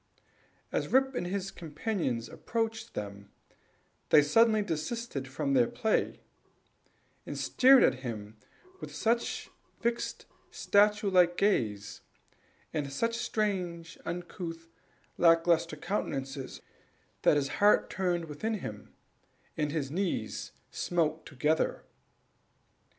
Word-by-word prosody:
As - - -1
Rip 265 +1 +3
and 175 - -2
his 195 +1 -3
companion 160 - -2
approached 225 0 -3
them, 100 -1 -6 0.8
they 150 - +7
suddenly 215 +7 +4
desisted 170 - -3
from 275 - -2
their 245 -3 +5
play, 225 -2 0 1.0
and - - -6
stared 260 0 +6
at 130 - +3
him 110 -4 -6 0.4
with - - -8
such, 235 +1 0 0.3
fixed, 235 0 -2 0.2
statue 210 0 +3
like 175 -1 +4
gaze, 105 - 0 0.7
and 145 -3 -2
such 230 +11 0
strange, 185 -7 -2
uncouth, 170 -1 -6 0.5
lack 165 -1 +5
lustre 165 -2 +2
countenances, 135 -7 -4 0.6
that - - +5
his 140 -1 0
heart 205 +1 +5
turned 175 -3 0
within 190 +9 -3
him, 105 - -8 0.6
and 150 -2 -1
his 145 -3 -2
knees 170 - -2 0.2
smote 160 -2 -1
together. 150 +3 0
175 Hz, 105 wpm, -30 LUFS, 145-215 Hz, 1.0 s, they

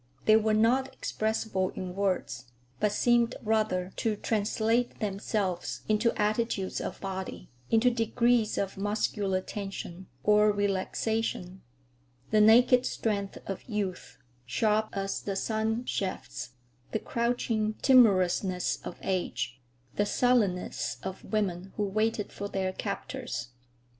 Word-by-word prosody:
They 215 - +7
were 220 0 +3
not 250 +5 +3
expressible 215 -3 -1
in 185 -2 -5
words, 180 -11 -1 0.3
but 210 -1 +2
seemed 240 +1 +3
rather 210 -4 +1
to 220 -2 0
translate 225 +3 0
themselves 195 -3 -2
into 215 +2 +2
attitudes 210 -2 0
of - - -5
body, 190 -6 -6 0.2
into 230 +2 +4
degrees 235 -1 +2
of 195 -1 -2
muscular 205 -2 0
tension 190 -2 -6 0.2
or 210 0 +5
relaxation; 205 -1 -1 0.7
the 215 0 +5
naked 245 +3 +6
strength 200 -3 -2
of 195 - -5
youth, 200 -4 -3 0.3
sharp 215 - +1
as 195 0 -2
the 195 - -3
sunshafts; 220 - -2 0.4
the - - +2
crouching 230 -2 0
timorousness 190 -7 +4
of - - -7
age, 130 -9 -2 0.4
the 205 - +3
sullenness 215 -7 +1
of 190 0 -6
women 195 -3 -2
who 210 - +1
waited 215 +1 0
for 200 - -4
their 190 -2 -2
captors. 120 -8 -4
210 Hz, 115 wpm, -29 LUFS, 190-225 Hz, 0.7 s, They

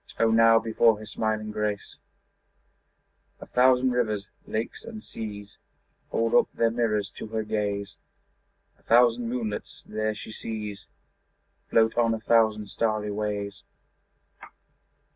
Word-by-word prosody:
O 115 0 +4
now 115 0 +6
before 115 0 +3
her 110 - -9
smiling 110 0 -2
grace 105 -1 -3 1.4
A - - -9
thousand 130 0 +4
rivers, 110 -5 -1 0.2
lakes 110 +1 -4
and 220 -1 -9
seas 105 -2 -8 0.5
Hold 115 0 0
up - - +4
their 115 -1 +2
mirrors 105 -4 0
to - - -8
her 110 0 -2
gaze: 100 -2 -3 0.8
A - - -27
thousand 120 0 +4
moonlets 115 -4 -4
there 110 0 -2
she - - -8
sees 105 -2 -6 0.8
Float 110 +1 +3
on 115 -1 +3
a - - -6
thousand 110 -2 +2
starry 110 -2 -1
ways. 100 -1 -3
110 Hz, 125 wpm, -26 LUFS, 105-115 Hz, 1.4 s, now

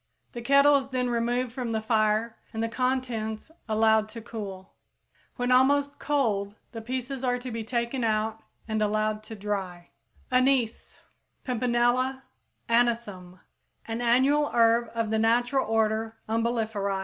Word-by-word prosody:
The 240 - -6
kettle 280 +3 +5
is 270 -1 -3
then 250 -2 -1
removed 240 +1 0
from 245 -2 -4
the 220 - +1
fire 220 0 +1 0.2
and 220 0 -3
the - - +1
contents 245 -1 -2 0.2
allowed 220 0 +3
to 230 +1 -8
cool. 195 -5 -8 0.6
When 245 0 -1
almost 280 +3 +3
cold 210 -9 0 0.2
the 225 - -7
pieces 255 +3 -4
are 250 -1 +1
to 250 0 -7
be 225 0 -4
taken 235 +2 -2
out 220 0 0 0.3
and 220 -1 -1
allowed 215 0 0
to 220 - -8
dry. 195 -4 -4 0.4
=Anise= 255 -2 +1 0.5
(Pimpinella 250 +2 +1 0.4
Anisum, 230 -6 0
Linn.), 185 - -22 0.5
an 225 +1 -3
annual 265 +5 +3
herb 230 0 +4
of 225 -2 -1
the 220 - +1
natural 245 +4 +2
order 220 0 0
Umbelliferæ. 220 -3 -1
230 Hz, 140 wpm, -27 LUFS, 220-250 Hz, 0.6 s, kettle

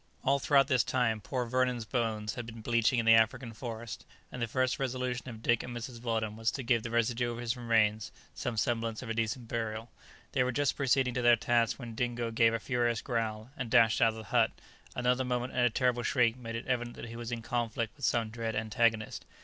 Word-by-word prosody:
All 140 +1 +3
throughout 140 -1 +4
this 130 -5 +3
time 115 -4 0
poor 125 +3 -2
Vernon's 125 -1 0
bones 110 -2 -1
had 120 -2 -6
been 115 -1 -9
bleaching 115 +2 +2
in 115 - +1
the 115 - +7
African 115 +2 +2
forest, 115 -2 -6 0.3
and 125 - -6
the 120 - 0
first 130 +3 0
resolution 125 -1 -2
of 110 -1 -10
Dick 120 -1 +3
and 120 -1 -6
Mrs. 120 0 -7
Weldon 110 -3 -1
was 115 0 0
to 135 - -4
give 115 -1 +2
the 120 - -5
residue 120 +1 +1
of 120 - -6
his 120 0 -2
remains 110 -3 +1 0.2
some 120 -2 -4
semblance 115 +1 -1
of 115 - -4
a - - 0
decent 115 +1 -2
burial. 115 0 -4 0.4
They 135 - +2
were 125 - 0
just 145 +2 +1
proceeding 135 -2 +2
to 125 - -1
their 120 0 +6
task 115 0 +1
when 120 -3 -7
Dingo 120 0 -2
gave 115 0 +4
a - - -1
furious 120 -2 0
growl, 115 -1 -2
and 125 -4 -4
dashed 110 0 +4
out 115 - +6
of - - -11
the 110 - -7
hut; 100 - +3 0.5
another 125 +1 +1
moment, 125 0 -2
and 125 - +1
a 120 - +5
terrible 125 +1 +1
shriek 120 -2 +2
made 115 -2 -7
it 115 - -5
evident 120 -1 -2
that - - -7
he 115 - -8
was 120 0 -6
in 115 -1 -4
conflict 115 -2 -2
with 140 - -15
some 115 -2 +1
dread 115 -1 -3
antagonist. 110 0 0
120 Hz, 230 wpm, -31 LUFS, 115-125 Hz, 0.5 s, the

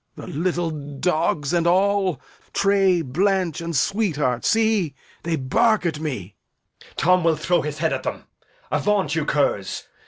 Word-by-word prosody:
Lear. - - -9
The - - -8
little 175 +1 -1
dogs 150 +1 -1
and 170 -1 +2
all, 190 -3 +2 0.3
Tray, 195 -3 +3
Blanch, 180 +4 0
and 170 -1 -4
Sweetheart, 150 - 0
see, 220 - +2 0.3
they 170 0 -1
bark 215 - +2
at 160 -3 -1
me. 125 - -5 0.5
Edg. - - -20
Tom 180 +1 +3
will 165 -1 +3
throw 175 +3 +1
his 150 0 -4
head 160 0 0
at - - -2
them. - - -4 0.5
Avaunt, 200 -8 +1
you 160 -2 0
curs! 120 -11 0
170 Hz, 155 wpm, -22 LUFS, 150-190 Hz, 0.5 s, Tray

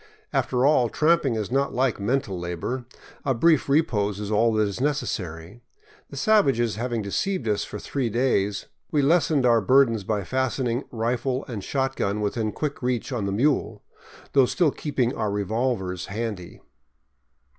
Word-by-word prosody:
After 125 0 +1
all, 130 -5 +4
tramping 155 -5 +2
is 110 0 -3
not 140 +2 0
like 130 -3 +1
mental 100 -3 -1
labor; 90 +9 -4 0.4
a 135 -2 +1
brief 155 +3 +3
re 150 +4 +5
pose 105 -6 -2
is 105 0 -4
all 115 +2 +3
that 110 -1 +2
is 100 +4 -5
necessary. 100 - -3 0.5
The - - -9
savages 135 - +3
having 120 -1 -2
deceived 135 - -2
us 105 -1 +1
for - - -7
three 130 +3 -2
days, 105 -4 0 0.3
we 145 -2 +2
lessened 150 -2 +3
our 115 -2 +4
burdens 115 -1 +3
by 105 0 -1
fastening 130 +2 -1
rifle 125 +3 -1
and 110 -6 -5
shotgun 135 -7 -1
within 105 +1 -1
quick 150 +3 -4
reach 125 +1 -1
on 115 -6 -2
the - - -1
mule, 130 +8 0 0.5
though 135 -3 +5
still 165 +1 +2
keeping 130 -5 -1
our 105 - -1
revolvers 100 -2 -2
handy. 105 -4 -5
120 Hz, 155 wpm, -25 LUFS, 105-135 Hz, 0.5 s, re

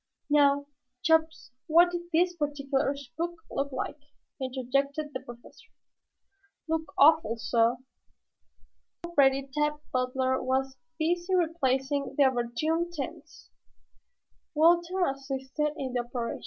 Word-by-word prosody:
"Now, 285 -1 +4 0.4
Chops, 320 -3 +2 0.2
what 345 +2 +5
did 345 0 -5
this 350 +2 +2
particular 285 -2 -1
spook 325 +6 -6
look 280 +1 -2
like?" 275 +3 -4 0.4
interjected 275 +3 -1
the 260 - -3
Professor. 240 -2 -14 1.0
"Look 320 -2 -2
awful, 255 -6 +5
sah!" 230 +1 +2 1.3
Already 275 -5 +3
Tad 300 0 +1 0.2
Butler 260 +1 0
was 265 +1 -1 0.2
busy 345 +3 0
replacing 280 -5 0
the 285 - +6
overturned 275 +7 0
tents. 310 +1 -8 1.0
Walter 345 +3 +4
assisted 270 +1 -2
in 260 -2 -4
the 250 - 0
operation. 240 -1 -4
280 Hz, 105 wpm, -28 LUFS, 260-320 Hz, 1.3 s, the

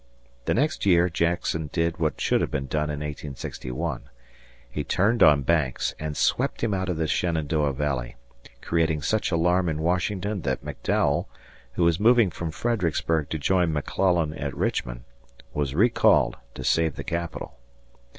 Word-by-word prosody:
The - - +1
next 150 +6 0
year 90 -2 +4
Jackson 80 -2 -1
did 85 0 -1
what 80 -2 -1
should - - +2
have - - 0
been 70 - -2
done 75 +3 -1
in 75 -1 -4
1861. 75 -1 -5 0.6
He - - -4
turned 110 +4 +1
on 75 -4 +6
Banks 75 -5 +1
and 75 -1 -4
swept - - 0
him 110 -3 +1
out 95 -1 -1
of 90 - -1
the 80 - 0
Shenandoah 80 -3 0
Valley, 65 -4 -2 0.5
creating 80 -3 0
such 110 -1 0
alarm 90 +1 +2
in 80 - -2
Washington 90 +4 -1
that 65 -3 -2
McDowell, - - 0 0.5
who 85 - 0
was 85 0 +3
moving 115 -2 +5
from 85 0 -4
Fredericksburg 80 -6 -1
to 80 - -2
join 90 +3 +2
McClellan 80 +1 +1
at - - -5
Richmond, - - -2 0.5
was 70 -2 -2
recalled 115 +7 +4 0.2
to - - -6
save 80 -2 +2
the - - -6
Capital. 85 -1 -4
80 Hz, 155 wpm, -25 LUFS, 75-90 Hz, 0.6 s, on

